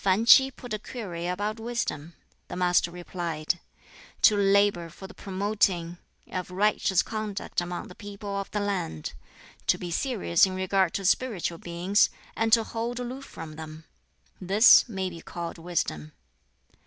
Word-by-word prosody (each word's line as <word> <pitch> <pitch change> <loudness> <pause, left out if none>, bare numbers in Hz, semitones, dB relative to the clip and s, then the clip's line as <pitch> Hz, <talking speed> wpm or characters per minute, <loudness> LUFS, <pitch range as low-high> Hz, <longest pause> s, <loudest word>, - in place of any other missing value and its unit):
Fan 195 +3 +2
Ch'i 265 +3 +8
put 245 -3 -9
a 215 - -2
query 180 -8 -6
about 205 +5 -2
wisdom. 220 -9 -3 0.3
The - - -6
Master 180 -1 +2
replied, 170 -2 -3 0.6
"To 210 - +7
labor 200 -3 +3
for 190 - -12
the - - -10
promoting 190 -3 -1 0.3
of 185 -1 -4
righteous 190 0 +2
conduct 215 -4 -3
among 175 0 -5
the - - -11
people 200 0 -7
of 200 0 -3
the 210 - -2
land; 185 - -3 0.5
to - - +4
be 175 -1 -6
serious 200 -5 +1
in 185 - -5
regard 190 -1 +1
to 195 - -2
spiritual 185 -6 0
beings, 175 +4 +2 0.3
and 225 0 0
to 225 0 +6
hold 235 +2 -4
aloof 255 +3 -6
from 155 - -9
them; 160 0 -9 0.6
this 205 +7 +7
may 190 -3 -2
be 170 -1 -9
called 170 -1 -6
wisdom." 150 - -3
190 Hz, 155 wpm, -27 LUFS, 175-215 Hz, 0.6 s, Ch'i